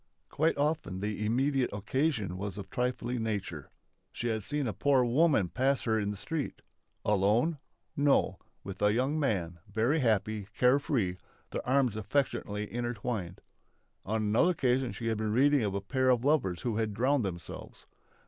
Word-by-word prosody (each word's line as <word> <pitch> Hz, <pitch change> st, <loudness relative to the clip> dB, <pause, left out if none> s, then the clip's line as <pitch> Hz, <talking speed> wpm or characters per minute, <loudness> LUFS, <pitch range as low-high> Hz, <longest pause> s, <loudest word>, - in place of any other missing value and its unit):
Quite 160 Hz, +1 st, +1 dB
often 145 Hz, -, -1 dB
the 105 Hz, +1 st, -3 dB
immediate 130 Hz, +4 st, +1 dB
occasion 110 Hz, -, -1 dB
was 100 Hz, 0 st, -5 dB
of 100 Hz, -, -5 dB
a -, -, -30 dB
trifling 125 Hz, 0 st, -2 dB
nature. 100 Hz, -9 st, -3 dB, 0.4 s
She 120 Hz, -, -3 dB
had 110 Hz, -1 st, -1 dB
seen 145 Hz, +5 st, -1 dB
a 110 Hz, -, -2 dB
poor 135 Hz, +4 st, +3 dB
woman 125 Hz, -, +3 dB
pass 135 Hz, +5 st, +1 dB
her 110 Hz, -2 st, +1 dB
in 100 Hz, -1 st, -1 dB
the 105 Hz, -, -4 dB
street. 150 Hz, +8 st, -4 dB, 0.4 s
Alone? 105 Hz, -, +2 dB, 0.4 s
No 145 Hz, -1 st, +2 dB, 0.2 s
with 100 Hz, 0 st, -8 dB
a 105 Hz, 0 st, +4 dB
young 135 Hz, +6 st, +1 dB
man, 90 Hz, -, -1 dB
very 120 Hz, +8 st, +2 dB
happy, 110 Hz, -4 st, 0 dB
care 125 Hz, +3 st, +5 dB
free, 110 Hz, -11 st, -1 dB, 0.3 s
their -, -, -4 dB
arms 130 Hz, -4 st, +3 dB
affectionately 105 Hz, -2 st, -1 dB
intertwined. 115 Hz, -6 st, -3 dB, 0.6 s
On 110 Hz, +2 st, -1 dB
another 110 Hz, +12 st, +3 dB
occasion 130 Hz, -6 st, +1 dB
she 115 Hz, -, -7 dB
had 110 Hz, -2 st, 0 dB
been 110 Hz, -1 st, -1 dB
reading 140 Hz, +3 st, +4 dB
of 100 Hz, -2 st, -1 dB
a 100 Hz, -, -1 dB
pair 130 Hz, +6 st, +1 dB
of 125 Hz, 0 st, +3 dB
lovers 95 Hz, -, +1 dB
who 115 Hz, -3 st, -1 dB
had 110 Hz, -2 st, -1 dB
drowned 130 Hz, +3 st, +2 dB
themselves. 85 Hz, -4 st, -7 dB
115 Hz, 165 wpm, -30 LUFS, 105-135 Hz, 0.6 s, care